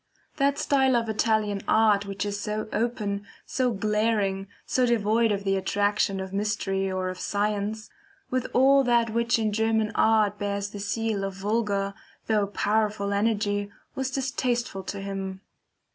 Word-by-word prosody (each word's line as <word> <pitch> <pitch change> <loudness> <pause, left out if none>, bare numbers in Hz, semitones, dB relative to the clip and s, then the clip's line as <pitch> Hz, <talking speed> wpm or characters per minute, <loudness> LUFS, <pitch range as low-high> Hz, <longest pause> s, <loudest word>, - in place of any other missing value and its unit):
That 280 0 +2
style 265 -2 +3
of 230 -1 +1
Italian 215 -2 +1
art 210 -2 +4
which 200 +1 -3
is 205 0 -3
so 210 +1 -3
open, 210 -3 -1 0.2
so 255 -2 0
glaring, 210 -2 0 0.2
so 255 -1 +2
devoid 225 0 +2
of 200 -1 -1
the 195 -1 +1
attraction 200 +1 +1
of 190 0 -6
mystery 195 -2 -1
or 185 0 -1
of 185 0 -6
science, 210 +2 -1 0.4
with 255 -1 0
all 275 +2 +5
that 235 -2 +3
which 235 +2 +2
in 215 -2 0
German 220 0 +1
art 215 -2 +3
bears 200 0 -2
the 205 - -7
seal 210 0 -1
of 195 -1 -3
vulgar, 200 -1 -1 0.3
though 210 -2 +2
powerful 205 0 0
energy, 205 -1 0 0.2
was 265 0 -2
distasteful 250 -5 -1
to 200 0 -5
him. 195 -1 -5
210 Hz, 150 wpm, -26 LUFS, 200-225 Hz, 0.4 s, all